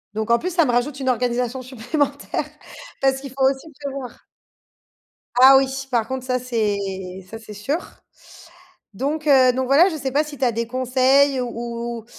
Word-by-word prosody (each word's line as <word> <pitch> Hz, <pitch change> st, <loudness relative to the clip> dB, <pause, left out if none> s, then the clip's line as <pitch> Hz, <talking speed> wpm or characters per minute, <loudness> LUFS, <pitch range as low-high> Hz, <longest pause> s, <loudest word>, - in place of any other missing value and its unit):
Donc 220 Hz, +1 st, -2 dB
en 235 Hz, -, +4 dB
plus 365 Hz, -, -3 dB
ça 335 Hz, -4 st, +4 dB
me 245 Hz, -, +1 dB
rajoute 260 Hz, +4 st, -1 dB
une 260 Hz, -1 st, -1 dB
organisation 250 Hz, +1 st, -1 dB
supplémentaire 275 Hz, +3 st, -2 dB, 0.6 s
parce 270 Hz, 0 st, +2 dB
qu'il 275 Hz, -, -7 dB
faut 265 Hz, 0 st, -2 dB
aussi 270 Hz, +3 st, -6 dB, 0.2 s
prévoir. 270 Hz, -3 st, -7 dB, 1.1 s
Ah 265 Hz, +2 st, +9 dB
oui, 270 Hz, 0 st, +3 dB, 0.2 s
par 230 Hz, -2 st, +1 dB
contre 260 Hz, -1 st, -5 dB
ça 255 Hz, -1 st, 0 dB
c'est 225 Hz, -5 st, -1 dB, 0.5 s
ça 225 Hz, -, -7 dB
c'est 215 Hz, -1 st, -11 dB
sûr. 220 Hz, +10 st, -2 dB, 1.2 s
Donc 300 Hz, +7 st, -3 dB
heu, 260 Hz, -3 st, +6 dB
donc 260 Hz, +1 st, -2 dB
voilà, 300 Hz, +8 st, +5 dB
je 315 Hz, -, -4 dB
sais 270 Hz, -2 st, -3 dB
pas 295 Hz, +4 st, +1 dB
si 295 Hz, -2 st, -10 dB
tu 265 Hz, -, 0 dB
as 240 Hz, -, +2 dB
des 230 Hz, +1 st, -2 dB
conseils 260 Hz, +2 st, +2 dB
ou 245 Hz, -, -2 dB, 0.5 s
ou 225 Hz, -, -12 dB
260 Hz, 180 wpm, -21 LUFS, 245-275 Hz, 1.2 s, Ah